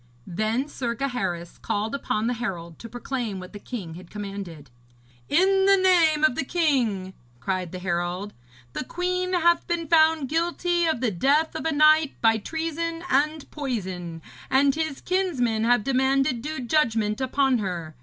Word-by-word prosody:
Then 215 Hz, +9 st, -1 dB
Sir 240 Hz, -5 st, -3 dB
Gaheris 230 Hz, -10 st, -3 dB
called 210 Hz, +2 st, -2 dB
upon 225 Hz, -5 st, -1 dB
the 245 Hz, -, +1 dB
herald 175 Hz, -9 st, -5 dB
to 230 Hz, -, -9 dB
proclaim 240 Hz, -4 st, -4 dB
what 185 Hz, +2 st, -10 dB
the 205 Hz, -, -8 dB
king 200 Hz, -8 st, -6 dB
had 175 Hz, +1 st, -11 dB
commanded. 195 Hz, -9 st, -7 dB, 0.6 s
'In 385 Hz, +4 st, +4 dB
the 395 Hz, 0 st, +6 dB
name 340 Hz, -5 st, +4 dB
of 310 Hz, -, +5 dB
the 270 Hz, -, -2 dB
king,' 250 Hz, -, 0 dB, 0.3 s
cried 180 Hz, +4 st, -2 dB
the 185 Hz, -, -6 dB
herald, 180 Hz, +2 st, -2 dB, 0.4 s
'the -, -, -4 dB
queen 365 Hz, +3 st, -2 dB
hath 345 Hz, -1 st, +3 dB
been 340 Hz, -1 st, -2 dB
found 315 Hz, -2 st, +4 dB
guilty 345 Hz, +2 st, 0 dB
of 315 Hz, -7 st, 0 dB
the 240 Hz, -4 st, +1 dB
death 280 Hz, -, +2 dB
of -, -, -3 dB
a -, -, +1 dB
knight 305 Hz, 0 st, +4 dB
by 225 Hz, -1 st, +3 dB
treason 330 Hz, +5 st, -3 dB
and 300 Hz, +3 st, +1 dB
poison, 185 Hz, -, -4 dB, 0.3 s
and 275 Hz, +1 st, +4 dB
his 315 Hz, -2 st, -3 dB
kinsmen 260 Hz, -13 st, 0 dB
have 245 Hz, -2 st, +3 dB
demanded 265 Hz, -1 st, +1 dB
due 305 Hz, +1 st, -4 dB
judgment 230 Hz, -5 st, +1 dB
upon 260 Hz, -1 st, +2 dB
her. 175 Hz, -6 st, -4 dB
260 Hz, 160 wpm, -25 LUFS, 205-315 Hz, 0.6 s, the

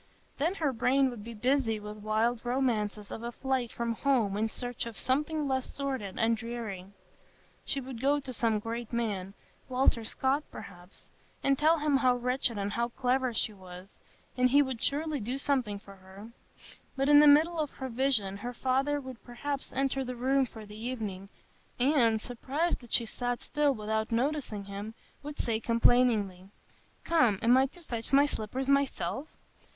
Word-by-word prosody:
Then 330 Hz, +7 st, +1 dB
her 300 Hz, -7 st, 0 dB
brain 260 Hz, +3 st, +2 dB
would 225 Hz, -4 st, -8 dB
be 230 Hz, +1 st, -8 dB
busy 245 Hz, -1 st, +1 dB
with 210 Hz, 0 st, -8 dB
wild 220 Hz, +3 st, 0 dB
romances 225 Hz, -5 st, -1 dB
of -, -, -6 dB
a 235 Hz, 0 st, -4 dB
flight 260 Hz, -1 st, -1 dB
from 235 Hz, -1 st, -2 dB
home 230 Hz, -5 st, +1 dB
in 215 Hz, +2 st, +1 dB
search 245 Hz, +1 st, -4 dB
of 230 Hz, -, -8 dB
something 300 Hz, +3 st, 0 dB
less 260 Hz, -1 st, -1 dB
sordid 265 Hz, -9 st, -4 dB
and 225 Hz, +1 st, +3 dB
dreary; 225 Hz, -5 st, -6 dB, 0.8 s
she 275 Hz, -, -1 dB
would 255 Hz, -3 st, -7 dB
go 285 Hz, +2 st, +3 dB
to 265 Hz, -2 st, -7 dB
some 225 Hz, -2 st, +1 dB
great 230 Hz, +2 st, -5 dB
man—Walter 230 Hz, +3 st, -1 dB
Scott, 265 Hz, +6 st, 0 dB
perhaps—and 195 Hz, +8 st, -5 dB
tell 315 Hz, +2 st, +5 dB
him 295 Hz, -2 st, +2 dB
how 255 Hz, -2 st, +3 dB
wretched 245 Hz, -2 st, -1 dB
and 200 Hz, 0 st, -2 dB
how 235 Hz, 0 st, 0 dB
clever 255 Hz, +1 st, 0 dB
she 220 Hz, -1 st, 0 dB
was, 185 Hz, 0 st, -12 dB, 0.4 s
and 255 Hz, 0 st, +3 dB
he 285 Hz, +3 st, +6 dB
would 260 Hz, -4 st, -5 dB
surely 300 Hz, +1 st, 0 dB
do 245 Hz, +4 st, -3 dB
something 260 Hz, -7 st, 0 dB
for 200 Hz, -1 st, -14 dB
her. 190 Hz, +4 st, -12 dB, 0.6 s
But, 270 Hz, +1 st, 0 dB
in 290 Hz, 0 st, +8 dB
the 300 Hz, -, +7 dB
middle 320 Hz, +4 st, +5 dB
of 300 Hz, -2 st, 0 dB
her 265 Hz, -, -5 dB
vision, 230 Hz, -6 st, 0 dB
her 245 Hz, +4 st, -6 dB
father 270 Hz, +4 st, +1 dB
would 260 Hz, -3 st, -9 dB
perhaps 275 Hz, +3 st, -4 dB
enter 270 Hz, 0 st, 0 dB
the 250 Hz, -1 st, -5 dB
room 265 Hz, +2 st, +2 dB
for 220 Hz, -2 st, -10 dB
the 210 Hz, +2 st, -10 dB
evening, 210 Hz, -6 st, -4 dB, 0.5 s
and, 245 Hz, -4 st, +4 dB
surprised 270 Hz, +9 st, -2 dB
that 240 Hz, -, -15 dB
she 235 Hz, -, +3 dB
sat 245 Hz, +2 st, -3 dB
still 295 Hz, -2 st, +1 dB
without 220 Hz, +1 st, -2 dB
noticing 245 Hz, -4 st, -1 dB
him, 200 Hz, +3 st, -7 dB, 0.3 s
would 295 Hz, 0 st, -7 dB
say 225 Hz, -2 st, -1 dB
complainingly, 230 Hz, -5 st, +2 dB, 0.5 s
"Come, 280 Hz, -12 st, +3 dB
am 240 Hz, +2 st, +6 dB
I 265 Hz, +1 st, +4 dB
to 350 Hz, +6 st, -18 dB
fetch 230 Hz, -6 st, -5 dB
my 280 Hz, +1 st, +6 dB
slippers 260 Hz, 0 st, -3 dB
myself?" 275 Hz, -, 0 dB
245 Hz, 170 wpm, -30 LUFS, 220-275 Hz, 0.8 s, in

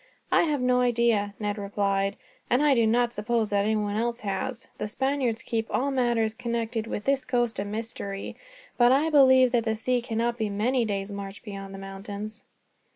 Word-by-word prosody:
"I -, -, +5 dB
have 295 Hz, -4 st, 0 dB
no 250 Hz, 0 st, +3 dB
idea," 235 Hz, -4 st, +2 dB
Ned 205 Hz, 0 st, -2 dB
replied, 200 Hz, 0 st, 0 dB, 0.3 s
"and 250 Hz, +4 st, +3 dB
I 295 Hz, -2 st, +5 dB
do 230 Hz, -3 st, +3 dB
not 240 Hz, +1 st, +2 dB
suppose 220 Hz, 0 st, -1 dB
that 200 Hz, 0 st, +2 dB
anyone 210 Hz, -1 st, 0 dB
else 235 Hz, +1 st, -1 dB
has. 225 Hz, +5 st, -3 dB
The -, -, -2 dB
Spaniards 260 Hz, 0 st, -1 dB
keep 225 Hz, -2 st, -2 dB
all 280 Hz, +2 st, 0 dB
matters 235 Hz, -4 st, +1 dB
connected 230 Hz, -1 st, -3 dB
with 210 Hz, -, -4 dB
this 275 Hz, -1 st, +2 dB
coast 240 Hz, -4 st, 0 dB
a 200 Hz, -, -1 dB
mystery; 205 Hz, -2 st, -5 dB, 0.4 s
but 240 Hz, 0 st, +6 dB
I 295 Hz, +5 st, +3 dB
believe 260 Hz, -3 st, +6 dB
that 235 Hz, -1 st, +2 dB
the 220 Hz, -1 st, +1 dB
sea 245 Hz, +3 st, 0 dB
cannot 235 Hz, 0 st, -1 dB
be 215 Hz, -1 st, 0 dB
many 230 Hz, +5 st, +1 dB
days' 200 Hz, -1 st, -3 dB
march 200 Hz, 0 st, -7 dB
beyond 195 Hz, -2 st, -7 dB
the -, -, -7 dB
mountains." 200 Hz, +2 st, -7 dB
225 Hz, 185 wpm, -27 LUFS, 205-245 Hz, 0.4 s, but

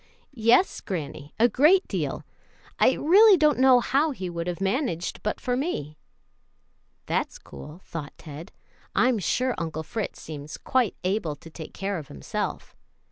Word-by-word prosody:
"Yes, 235 Hz, -, +3 dB
granny, 150 Hz, -5 st, -6 dB
a 235 Hz, -, +6 dB
great 305 Hz, -, +4 dB
deal. -, -, -3 dB, 0.5 s
I -, -, +5 dB
really 395 Hz, +5 st, +6 dB
don't 300 Hz, -4 st, +3 dB
know 260 Hz, -1 st, +7 dB
how 285 Hz, +6 st, +2 dB
he 190 Hz, -11 st, -5 dB
would 170 Hz, 0 st, -4 dB
have 175 Hz, 0 st, -3 dB
managed 195 Hz, -, -1 dB
but 210 Hz, -, -2 dB
for 250 Hz, -1 st, -1 dB
me." 200 Hz, -, -3 dB, 1.1 s
"That's -, -, -1 dB
cool," 150 Hz, -, -12 dB
thought 155 Hz, -4 st, -7 dB
Ted; 155 Hz, +4 st, -10 dB, 0.4 s
"I'm 240 Hz, +2 st, +3 dB
sure 255 Hz, +7 st, 0 dB
Uncle 160 Hz, -1 st, -4 dB
Fritz 215 Hz, +6 st, -4 dB
seems 150 Hz, 0 st, -8 dB
quite 255 Hz, -6 st, 0 dB
able 180 Hz, -5 st, -1 dB
to 165 Hz, +3 st, -14 dB
take 160 Hz, -1 st, -9 dB
care 195 Hz, -2 st, -2 dB
of 150 Hz, -, -10 dB
himself." 70 Hz, -2 st, -5 dB
195 Hz, 150 wpm, -26 LUFS, 160-260 Hz, 1.1 s, know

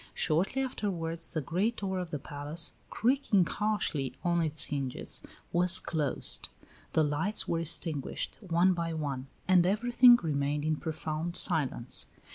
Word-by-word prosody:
Shortly 185 Hz, +12 st, +1 dB
afterwards 170 Hz, -9 st, -3 dB
the 160 Hz, -, -3 dB
great 190 Hz, -, -1 dB
door 190 Hz, -2 st, -3 dB
of 180 Hz, -2 st, -5 dB
the 150 Hz, -, -3 dB
palace, 145 Hz, +4 st, -2 dB, 0.2 s
creaking 235 Hz, -6 st, +1 dB
harshly 165 Hz, -, -2 dB
on 175 Hz, -1 st, +1 dB
its 155 Hz, -2 st, +3 dB
hinges, 135 Hz, -4 st, -4 dB, 0.3 s
was 180 Hz, +1 st, +6 dB
closed; 155 Hz, -4 st, 0 dB, 0.4 s
the 160 Hz, -, +3 dB
lights 155 Hz, +8 st, -1 dB
were 165 Hz, -, -1 dB
extinguished 155 Hz, -3 st, 0 dB
one 185 Hz, -1 st, +2 dB
by 170 Hz, -1 st, -3 dB
one, 140 Hz, -4 st, -4 dB, 0.2 s
and 185 Hz, -2 st, +5 dB
everything 240 Hz, +6 st, +5 dB
remained 145 Hz, -1 st, -2 dB
in 155 Hz, -1 st, 0 dB
profound 160 Hz, +1 st, -4 dB
silence. 140 Hz, -10 st, +3 dB
165 Hz, 135 wpm, -29 LUFS, 150-185 Hz, 0.4 s, was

